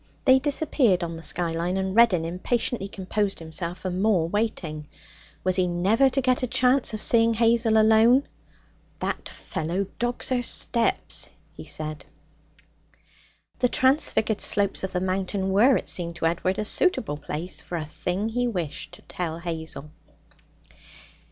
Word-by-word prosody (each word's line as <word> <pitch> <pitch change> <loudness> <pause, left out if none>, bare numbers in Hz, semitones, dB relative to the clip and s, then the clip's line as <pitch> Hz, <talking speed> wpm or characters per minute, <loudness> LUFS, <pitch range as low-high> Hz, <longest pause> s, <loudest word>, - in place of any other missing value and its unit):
They 260 -1 +6
disappeared 275 - +1
on 170 -1 -4
the 165 - -9
skyline, 170 +2 -2
and 190 0 -2
Reddin 215 -8 +4
impatiently 195 +4 -2
composed 200 +1 -2
himself 170 +2 -4
for 185 - -3
more 185 -2 +1
waiting. 170 -7 -3 0.6
Was 185 0 +1
he 185 -1 +2
never 195 +10 +3
to 270 +1 0
get 255 -1 +1
a 255 - -1
chance 250 +2 +2
of 215 - -3
seeing 230 -1 +3
Hazel 230 0 +3
alone? 225 +5 +5 0.7
'That - - -4
fellow 175 +5 -3
dogs 240 0 -2
her 255 -1 +1
steps,' 235 -1 +1 0.2
he - - -11
said. 155 -1 -4 1.5
The 250 -1 +2
transfigured 260 -6 +2
slopes 200 -1 0
of 190 - -3
the 180 - 0
mountain 190 +1 -1
were, 235 +7 +5
it - - -2
seemed 170 -2 -2
to 170 - -3
Edward, 180 +3 0
a 215 - -2
suitable 215 - +1
place 155 +4 -5
for 175 - -7
a 155 - -4
thing 180 +7 -3
he 245 +2 -1
wished 175 -10 -5
to - - -12
tell 165 -3 -4
Hazel. 160 -3 -4
195 Hz, 150 wpm, -25 LUFS, 170-235 Hz, 1.5 s, They